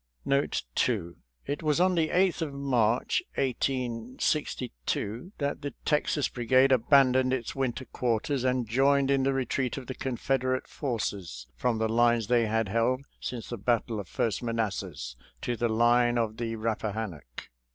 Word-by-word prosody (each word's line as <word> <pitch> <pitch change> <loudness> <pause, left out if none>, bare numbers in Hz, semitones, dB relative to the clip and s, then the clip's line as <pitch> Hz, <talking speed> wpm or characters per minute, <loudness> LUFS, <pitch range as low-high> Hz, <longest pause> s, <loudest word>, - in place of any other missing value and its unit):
Note 140 +1 +1
2 90 - 0 0.2
— - - -43
It 145 - -3
was 155 -1 +1
on 185 +1 +4
the 160 -3 +1
8th 185 -1 +2
of 145 -4 -3
March, 125 -4 +1
1862, 125 - -2
that 145 0 -2
the 145 -3 -5
Texaa 150 -1 +1
Brigade 130 +2 +4
abandoned 130 0 +4
its 130 -3 -2
winter 130 -1 -2
quarters 125 +3 -1
and 125 -2 +1
joined 135 +3 +3
in 135 -1 +3
the 135 +1 +2
retreat 130 -1 -1
of 135 - -6
the 130 - -5
Confederate 130 0 -1
forces 100 - -4
from 115 - 0
the 110 0 +1
lines 120 0 +3
they 120 -2 +3
had 115 0 0
held 115 +6 +1
since 120 -3 -5
the 120 - -5
battle 115 0 0
of 100 - -6
First 110 +1 -1
Manassas 100 - -3 0.3
to 120 - -1
the 120 0 0
line 120 +2 +3
of 110 -2 -1
the 115 -1 -3
Rappahannock. 110 - -4
120 Hz, 155 wpm, -28 LUFS, 110-135 Hz, 0.3 s, on